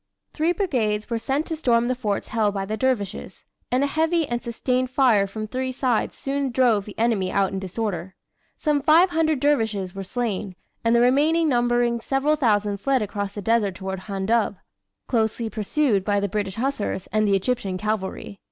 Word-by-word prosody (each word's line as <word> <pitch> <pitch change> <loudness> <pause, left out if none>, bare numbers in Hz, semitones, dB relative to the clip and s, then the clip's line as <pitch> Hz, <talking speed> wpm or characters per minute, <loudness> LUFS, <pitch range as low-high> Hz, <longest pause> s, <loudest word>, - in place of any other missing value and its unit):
Three 320 +2 +1
brigades 235 - -1
were 230 - 0
sent 275 +6 -1
to 325 - -3
storm 240 -6 +2
the 255 - +1
forts 215 -5 -3
held 215 -3 +1
by 195 -1 -2
the 215 +2 -3
dervishes, 225 -5 -2 0.3
and 255 +2 +2
a - - +3
heavy 320 +2 +1
and 240 -1 -2
sustained 250 +2 -1
fire 245 -7 +3
from 215 +2 -5
three 260 +4 -3
sides 250 -3 -1
soon 275 0 -2
drove 235 -5 +2
the 205 - -11
enemy 220 -5 +1
out 195 -1 +1
in 195 - -3
disorder. 190 -1 -4 0.4
Some 295 -2 +1
500 320 -1 +4
dervishes 220 -10 0
were 195 - -5
slain, 205 -3 -3 0.3
and 230 0 +3
the 235 - +5
remainder 295 +7 +3
numbering 240 -3 +2
several 270 +5 +1
thousand 210 -7 +1
fled 265 +1 +1
across 205 -1 -4
the 205 - -6
desert 220 -4 +1
toward 190 0 -5
Handub 200 +3 0 0.5
closely 225 -1 0
pursued 215 -1 +1
by 205 0 +1
the 200 - 0
British 200 -1 -3
Hussars 225 -6 -2
and 215 +1 +2
the 200 - +3
Egyptian 195 -2 -1
cavalry. 200 -1 -3
230 Hz, 180 wpm, -23 LUFS, 205-265 Hz, 0.5 s, the